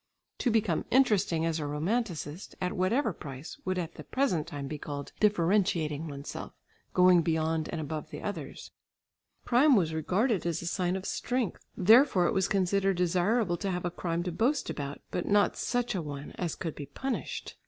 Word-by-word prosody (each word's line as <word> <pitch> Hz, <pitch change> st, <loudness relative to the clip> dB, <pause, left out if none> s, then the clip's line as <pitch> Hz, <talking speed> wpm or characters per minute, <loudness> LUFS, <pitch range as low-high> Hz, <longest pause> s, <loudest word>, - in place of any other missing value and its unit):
To 250 Hz, -, +1 dB
become 220 Hz, -7 st, +1 dB
interesting 210 Hz, -10 st, +3 dB
as 165 Hz, -1 st, 0 dB
a 150 Hz, -, -3 dB
romanticist 170 Hz, +1 st, -2 dB
at 180 Hz, -1 st, -1 dB
whatever 215 Hz, +5 st, +1 dB
price 140 Hz, -1 st, -8 dB
would 185 Hz, 0 st, 0 dB
at 170 Hz, -2 st, -3 dB
the -, -, -9 dB
present 185 Hz, -, 0 dB
time 145 Hz, -4 st, -5 dB
be 150 Hz, +1 st, -5 dB
called 140 Hz, -1 st, -6 dB
"differentiating 175 Hz, -6 st, +2 dB
oneself, 140 Hz, -1 st, -7 dB, 0.4 s
going 180 Hz, -1 st, +6 dB
beyond 160 Hz, -1 st, 0 dB
and 165 Hz, -, -3 dB
above 155 Hz, 0 st, -4 dB
the -, -, -7 dB
others." 165 Hz, -10 st, -6 dB, 0.7 s
Crime 260 Hz, +3 st, +5 dB
was 165 Hz, -6 st, +2 dB
regarded 195 Hz, -, +1 dB
as 165 Hz, -1 st, -1 dB
a -, -, -6 dB
sign 180 Hz, +1 st, 0 dB
of 190 Hz, 0 st, -5 dB
strength, 245 Hz, -2 st, -2 dB
therefore 215 Hz, -1 st, +6 dB
it -, -, +2 dB
was 190 Hz, -1 st, +2 dB
considered 195 Hz, -1 st, +1 dB
desirable 180 Hz, +2 st, +2 dB
to 195 Hz, -, -2 dB
have 180 Hz, -1 st, -2 dB
a 175 Hz, -, -1 dB
crime 170 Hz, 0 st, -2 dB
to 180 Hz, -, -3 dB
boast 250 Hz, -, +1 dB
about, 140 Hz, -1 st, -5 dB
but 180 Hz, -, -2 dB
not 205 Hz, 0 st, +3 dB
such 245 Hz, -1 st, -1 dB
a 185 Hz, -, -1 dB
one 145 Hz, -2 st, -6 dB
as 175 Hz, -3 st, -3 dB
could 165 Hz, -4 st, -4 dB
be 145 Hz, -, -8 dB
punished. 265 Hz, -, -4 dB
180 Hz, 180 wpm, -29 LUFS, 160-205 Hz, 0.7 s, going